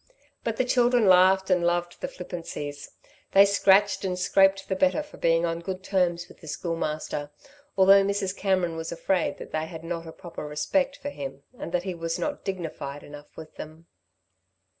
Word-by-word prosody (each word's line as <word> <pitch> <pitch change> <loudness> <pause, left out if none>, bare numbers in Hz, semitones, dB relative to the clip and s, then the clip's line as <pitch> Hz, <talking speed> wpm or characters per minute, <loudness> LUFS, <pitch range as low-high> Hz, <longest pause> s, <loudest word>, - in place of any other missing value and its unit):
But 225 -1 -2
the 255 - +1
children 245 -2 +3
laughed 190 +1 +5
and 180 -1 +3
loved 175 0 -1
the - - -2
flippancies. 165 -5 -7 0.4
They 195 +1 +8
scratched 200 0 +3
and 185 -2 -2
scraped 195 +2 +3
the 190 - -1
better 280 +8 +2
for 300 - -15
being 165 0 +2
on 165 0 -2
good 185 +2 -5
terms 180 -3 0
with - - -17
the 160 - -12
Schoolmaster, 155 -2 -3 0.5
although 195 +1 +7
Mrs. 200 -1 -1
Cameron 185 -4 0
was 160 0 -5
afraid 175 +1 0
that - - -10
they 155 0 -2
had 160 0 -9
not 165 0 -5
a - - -7
proper 170 -3 -8
respect 270 - 0
for 285 0 -6
him 135 - -7
and 170 - -7
that 180 0 0
he 190 -1 -3
was 165 -1 -3
not 290 -1 -3
dignified 160 -6 -5
enough 145 0 -13
with 160 -1 -11
them. 155 +2 -10
180 Hz, 180 wpm, -26 LUFS, 165-195 Hz, 0.5 s, They